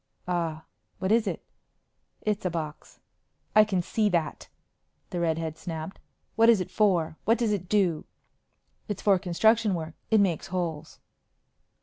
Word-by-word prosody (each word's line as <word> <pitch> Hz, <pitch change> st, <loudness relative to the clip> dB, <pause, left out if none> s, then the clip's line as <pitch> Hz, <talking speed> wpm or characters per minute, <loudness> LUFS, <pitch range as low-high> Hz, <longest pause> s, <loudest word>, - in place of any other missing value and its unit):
"Ah 165 Hz, -3 st, -2 dB, 0.3 s
what 190 Hz, -, -1 dB
is 230 Hz, 0 st, +3 dB
it?" -, -, -4 dB, 0.8 s
"It's 210 Hz, -1 st, -1 dB
a 180 Hz, -, 0 dB
box." 155 Hz, -3 st, -6 dB, 0.6 s
"I 215 Hz, -, +9 dB
can 190 Hz, -4 st, -1 dB
see 215 Hz, +3 st, +1 dB
that," 170 Hz, -4 st, -1 dB, 0.6 s
the 175 Hz, -, -2 dB
redhead 160 Hz, -1 st, -1 dB
snapped. 160 Hz, +1 st, -6 dB, 0.4 s
"What 230 Hz, 0 st, +5 dB
is 230 Hz, -4 st, +6 dB
it 185 Hz, -, -4 dB
for? 170 Hz, -7 st, +2 dB
What 225 Hz, +2 st, +4 dB
does 230 Hz, -3 st, +1 dB
it 185 Hz, -4 st, -2 dB
do?" 185 Hz, -7 st, +2 dB, 0.8 s
"It's 205 Hz, -4 st, -4 dB
for 195 Hz, -3 st, +4 dB
construction 210 Hz, +3 st, +2 dB
work. 160 Hz, -1 st, -5 dB, 0.2 s
It 220 Hz, -, +5 dB
makes 190 Hz, -3 st, +1 dB
holes." 170 Hz, -4 st, -4 dB
180 Hz, 145 wpm, -27 LUFS, 165-210 Hz, 0.8 s, I